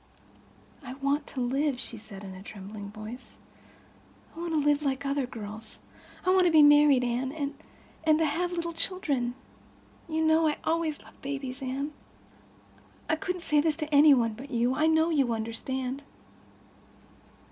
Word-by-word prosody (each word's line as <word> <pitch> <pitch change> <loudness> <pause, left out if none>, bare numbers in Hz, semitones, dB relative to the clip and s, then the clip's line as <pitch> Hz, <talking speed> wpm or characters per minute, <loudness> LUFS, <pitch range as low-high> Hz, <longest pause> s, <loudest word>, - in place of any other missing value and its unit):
"I 255 -3 -7
want 280 +2 -1
to 265 - -6
live," 265 +2 0
she 235 - -3
said, 200 -2 -11
in 190 -1 -8
a 185 - -10
trembling 200 0 -8
voice. 215 +4 -10 1.0
"I - - -9
want 340 -1 -3
to 310 - +3
live 290 0 +2
like 280 -1 -1
other 275 -2 0
girls. 220 -2 -9 0.5
I—I 370 - +4
want 370 -1 +5
to - - +3
be 310 -2 +7
married, 290 -3 +6
Anne—and—and—have 300 +5 -1
little 340 -1 -3
children. 295 -8 -1 0.7
You 320 0 0
know 315 0 +4
I 300 - 0
always 320 -2 -1
loved - - -19
babies, 270 -2 -5
Anne. 275 +3 -3 1.1
I 320 - +2
couldn't 360 +2 -4
say 300 -3 +3
this 315 -1 +1
to 305 -1 -5
any 290 0 +8
one 230 -3 +1
but 265 +6 -10
you. 245 0 +1
I 305 +4 +2
know 320 +1 +3
you 275 -7 +2
understand. 255 +4 -3
280 Hz, 155 wpm, -28 LUFS, 245-315 Hz, 1.1 s, any